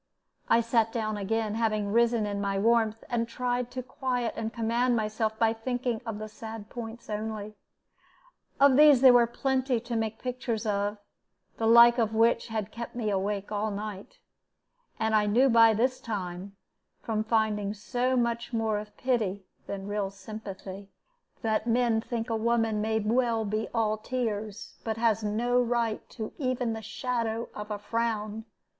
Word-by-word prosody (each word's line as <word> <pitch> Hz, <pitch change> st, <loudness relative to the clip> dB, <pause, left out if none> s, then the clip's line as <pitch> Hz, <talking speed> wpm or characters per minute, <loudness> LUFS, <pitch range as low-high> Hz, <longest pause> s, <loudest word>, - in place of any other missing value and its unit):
I 230 Hz, -, +5 dB
sat 230 Hz, -1 st, +2 dB
down 215 Hz, -2 st, -2 dB
again, 210 Hz, +1 st, -1 dB
having 215 Hz, -2 st, 0 dB
risen 235 Hz, -1 st, +3 dB
in 200 Hz, -1 st, -3 dB
my 200 Hz, -1 st, -1 dB
warmth, 225 Hz, +1 st, +2 dB
and 230 Hz, -1 st, -1 dB
tried 245 Hz, +1 st, -2 dB
to 255 Hz, 0 st, -5 dB
quiet 250 Hz, -2 st, -2 dB
and 225 Hz, 0 st, -3 dB
command 235 Hz, +2 st, +1 dB
myself 220 Hz, 0 st, -1 dB
by 225 Hz, -1 st, +3 dB
thinking 245 Hz, 0 st, -2 dB
of 220 Hz, -2 st, -3 dB
the 215 Hz, 0 st, -6 dB
sad 220 Hz, 0 st, -9 dB
points 235 Hz, -1 st, -7 dB
only. 215 Hz, 0 st, -4 dB, 1.1 s
Of 275 Hz, -1 st, +6 dB
these 295 Hz, -4 st, +7 dB
there 260 Hz, -2 st, +9 dB
were 240 Hz, -1 st, +6 dB
plenty 260 Hz, 0 st, 0 dB
to 240 Hz, 0 st, -5 dB
make 220 Hz, -1 st, -1 dB
pictures 245 Hz, -3 st, -3 dB
of, 205 Hz, 0 st, 0 dB, 0.6 s
the 225 Hz, -, 0 dB
like 235 Hz, +1 st, +8 dB
of 220 Hz, -1 st, +1 dB
which 230 Hz, +1 st, +3 dB
had 220 Hz, -2 st, -3 dB
kept 235 Hz, +1 st, -7 dB
me 220 Hz, -3 st, -1 dB
awake 200 Hz, +1 st, -2 dB
all 210 Hz, +1 st, -1 dB
night; 205 Hz, -, -6 dB, 0.8 s
and 220 Hz, 0 st, 0 dB
I 210 Hz, -1 st, +3 dB
knew 250 Hz, +6 st, +4 dB
by 230 Hz, -2 st, +6 dB
this 255 Hz, +4 st, +1 dB
time, 195 Hz, -3 st, -5 dB, 0.5 s
from 215 Hz, -1 st, -1 dB
finding 215 Hz, -2 st, 0 dB
so 250 Hz, +4 st, -1 dB
much 235 Hz, -1 st, -1 dB
more 220 Hz, -2 st, 0 dB
of 210 Hz, 0 st, -11 dB
pity 215 Hz, -7 st, -1 dB, 0.2 s
than 195 Hz, -1 st, -5 dB
real 205 Hz, -1 st, -2 dB
sympathy, 200 Hz, -1 st, -8 dB, 0.5 s
that 220 Hz, 0 st, 0 dB
men 235 Hz, -1 st, +2 dB
think 230 Hz, 0 st, -4 dB
a 225 Hz, -, -1 dB
woman 225 Hz, -1 st, +1 dB
may 220 Hz, +1 st, 0 dB
well 225 Hz, +1 st, +1 dB
be 215 Hz, +2 st, -2 dB
all 215 Hz, -2 st, 0 dB
tears, 215 Hz, -3 st, -4 dB
but 220 Hz, -1 st, -2 dB
has 225 Hz, -1 st, +2 dB
no 240 Hz, +4 st, +1 dB
right 235 Hz, -2 st, -1 dB
to 220 Hz, -1 st, -6 dB
even 255 Hz, -4 st, 0 dB
the 220 Hz, -, -5 dB
shadow 230 Hz, 0 st, -2 dB
of 210 Hz, 0 st, -7 dB
a 210 Hz, -, -2 dB
frown. 220 Hz, 0 st, -2 dB
225 Hz, 165 wpm, -28 LUFS, 210-235 Hz, 1.1 s, there